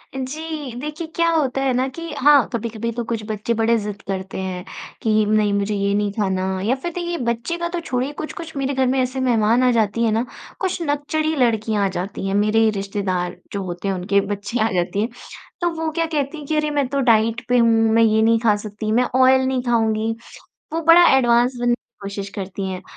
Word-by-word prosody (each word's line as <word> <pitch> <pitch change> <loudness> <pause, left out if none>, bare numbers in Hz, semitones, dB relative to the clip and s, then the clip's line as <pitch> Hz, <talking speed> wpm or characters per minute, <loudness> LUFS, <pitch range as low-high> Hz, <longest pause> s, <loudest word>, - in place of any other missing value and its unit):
जी, 295 +1 -5
देखिए 300 +3 -5
क्या 335 0 +3
होता 280 -5 +1
है 270 -1 +1
ना 255 +2 +1
कि 335 +5 -7
हाँ, 285 -1 +5
कभी-कभी 230 0 -3
तो 235 +1 -3
कुछ 225 -1 -3
बच्चे 215 +1 -2
बड़े 230 +1 +2
ज़िद 210 -1 -5
करते 190 0 -4
हैं 185 -1 -4 0.4
कि 215 -1 +2
नहीं 210 -1 +2
मुझे 200 +1 0
ये 200 0 0
नहीं 205 0 0
खाना 190 -3 -1 0.2
या 245 +4 +2
फ़िर 310 +6 -5
देखिए 345 0 -3
बच्चे 235 +8 -2
का 340 0 -2
तो 350 0 -3
छोड़िए 260 -4 -2
कुछ-कुछ 320 0 -7
मेरे 275 0 -1
घर 265 -1 +1
में 260 +1 +1
ऐसे 255 +1 -1
मेहमान 235 -1 +3
आ 250 - +4
जाती 230 -1 +1
हैं 225 - +2
ना, 225 +3 +1 0.3
कुछ 375 -2 -2
नकचढ़ी 310 +1 -1
लड़कियाँ 220 -5 +1
आ - - +3
जाती 190 +1 -4
हैं। 195 - -1
मेरे 215 +2 +3
रिश्तेदार 195 -3 -2 0.2
जो 200 -1 -2
होते 180 +1 -5
हैं 195 - 0
उनके 195 +2 +1
बच्चियाँ 215 +3 -1
आ - - -4
जाती 180 +3 0
हैं। 225 - -1 0.5
तो 345 - +2
वो 320 - 0
क्या 330 +1 0
कहती 300 -1 -2
हैं 300 - -8
कि, 310 - 0
"अरे! 305 0 +1
मैं 285 -2 0
तो 280 +2 -2
डाइट 230 -1 +2
पे 250 - +4
हूँ, 230 -1 +5 0.2
मैं 230 0 +5
ये 220 -1 +3
नहीं 225 +1 +4
खा 220 -2 +3
सकती, 215 +1 -5
मैं 240 +3 +3
ऑयल 260 0 +5
नहीं 260 -1 0
खाऊँगी।" 225 -2 +1 0.6
वो 325 - -1
बड़ा 335 +2 +7
एडवांस 240 0 +3
बनने 240 0 +2
की - - -7 0.2
कोशिश 200 0 -5
करती 195 0 -4
हैं। 185 -1 -5
235 Hz, 220 wpm, -21 LUFS, 210-275 Hz, 0.6 s, बड़ा